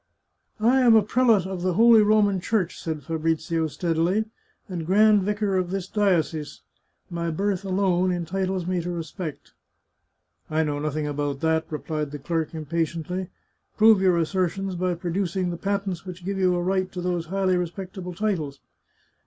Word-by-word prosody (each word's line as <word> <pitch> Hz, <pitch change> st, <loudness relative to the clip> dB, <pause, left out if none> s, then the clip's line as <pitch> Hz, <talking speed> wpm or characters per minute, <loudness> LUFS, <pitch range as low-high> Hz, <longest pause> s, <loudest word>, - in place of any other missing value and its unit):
" -, -, -45 dB, 0.2 s
I -, -, +4 dB
am 240 Hz, -3 st, +6 dB
a 220 Hz, -, +6 dB
prelate 225 Hz, -3 st, +3 dB
of 190 Hz, -2 st, -4 dB
the 185 Hz, 0 st, 0 dB
Holy 230 Hz, +3 st, +7 dB
Roman 210 Hz, -2 st, +3 dB
Church," 190 Hz, -3 st, -1 dB
said 155 Hz, -3 st, -4 dB
Fabrizio 165 Hz, 0 st, -1 dB
steadily, 170 Hz, +6 st, 0 dB, 0.2 s
" -, -, -41 dB
and 180 Hz, -4 st, -4 dB
grand 210 Hz, +4 st, +5 dB
vicar 205 Hz, 0 st, 0 dB
of 180 Hz, -1 st, -1 dB
this 190 Hz, -1 st, -3 dB
diocese; 165 Hz, -8 st, 0 dB, 0.5 s
my 170 Hz, -1 st, -2 dB
birth 195 Hz, +3 st, -1 dB
alone 185 Hz, -1 st, +1 dB
entitles 185 Hz, +1 st, -2 dB
me 180 Hz, -1 st, -1 dB
to 175 Hz, -, -5 dB
respect." 170 Hz, -1 st, -6 dB, 0.5 s
" -, -, -51 dB, 0.2 s
I 155 Hz, +1 st, +1 dB
know 145 Hz, -2 st, -2 dB
nothing 150 Hz, 0 st, -2 dB
about 145 Hz, -1 st, -3 dB
that," 160 Hz, 0 st, +1 dB
replied 155 Hz, -1 st, -3 dB
the 145 Hz, -, -6 dB
clerk 160 Hz, +2 st, -2 dB
impu 160 Hz, +1 st, -2 dB, 0.2 s
dently. 180 Hz, +1 st, -4 dB, 0.2 s
" -, -, -46 dB
Prove 220 Hz, -2 st, +6 dB
your 185 Hz, -2 st, +4 dB
assertions 185 Hz, +3 st, -1 dB
by 180 Hz, 0 st, -1 dB
producing 180 Hz, +1 st, -2 dB
the -, -, -3 dB
patents 195 Hz, -2 st, -2 dB
which 180 Hz, -1 st, -9 dB
give 195 Hz, 0 st, -2 dB
you 185 Hz, -1 st, +3 dB
a 175 Hz, -, -1 dB
right 185 Hz, 0 st, 0 dB
to 180 Hz, -, -5 dB
those 175 Hz, -2 st, -2 dB
highly 190 Hz, 0 st, +1 dB
respectable 180 Hz, +1 st, -5 dB
titles." 165 Hz, -9 st, -2 dB
180 Hz, 175 wpm, -25 LUFS, 165-195 Hz, 0.5 s, Holy